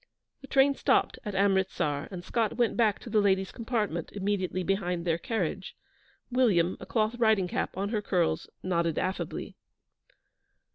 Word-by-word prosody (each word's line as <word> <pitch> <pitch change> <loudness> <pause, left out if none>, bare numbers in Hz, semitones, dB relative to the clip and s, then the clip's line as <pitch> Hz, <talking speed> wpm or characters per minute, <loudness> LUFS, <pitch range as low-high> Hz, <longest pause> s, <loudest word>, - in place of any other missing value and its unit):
The 270 - -11
train 275 +1 +4
stopped - - +1
at 210 -4 -5
Amritsar, 190 -7 +1
and 180 -3 -7
Scott 225 +2 -1
went 240 -2 +2
back 220 -4 +3
to - - -9
the 215 -1 +4
ladies' 190 -1 +2
compartment, 215 -9 -2
immediately 190 -2 -1
behind 180 -2 -1
their 165 -1 +1
carriage. 190 -3 -3 0.6
William, 195 -9 +3
a - - -9
cloth 220 -1 +1
riding 220 -5 +3
cap 175 - -3
on 200 +1 -1
her 215 -2 -1
curls, 170 -5 0
nodded 170 -3 0
affably. 185 +1 -3
195 Hz, 150 wpm, -29 LUFS, 180-220 Hz, 0.6 s, train